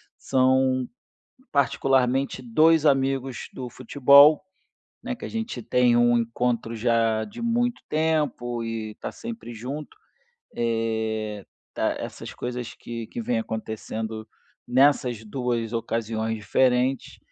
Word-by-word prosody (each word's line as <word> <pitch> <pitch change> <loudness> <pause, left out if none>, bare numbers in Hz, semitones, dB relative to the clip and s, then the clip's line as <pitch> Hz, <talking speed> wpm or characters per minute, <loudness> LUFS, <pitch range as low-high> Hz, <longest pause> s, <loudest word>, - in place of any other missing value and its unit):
são 130 0 +2 0.6
particularmente 135 -1 +1
2 155 +6 +4
amigos 135 -2 +1
do 125 -2 -6
futebol, 140 +4 +6 0.6
né, 255 +1 -3
que - - -10
a - - -6
gente 225 - -4
tem 120 +1 +3
um 120 0 +4
encontro 115 0 -1
já 115 -1 +1
de 110 - -9
muito 240 +1 0
tempo 150 -7 0
e 110 -1 -4
tá - - -5
sempre 230 - -8
junto. 135 +7 -7 0.6
É 110 -3 -2 0.3
tá - - 0
essas - - -7
coisas 125 -1 -5
que 115 -1 -7
que 120 - -6
vêm 115 0 0
acontecendo 110 0 -5 0.4
nessas 125 -3 +3
2 120 0 -2
ocasiões 115 -1 -2
diferentes, 125 +4 +1
125 Hz, 115 wpm, -25 LUFS, 115-135 Hz, 0.6 s, futebol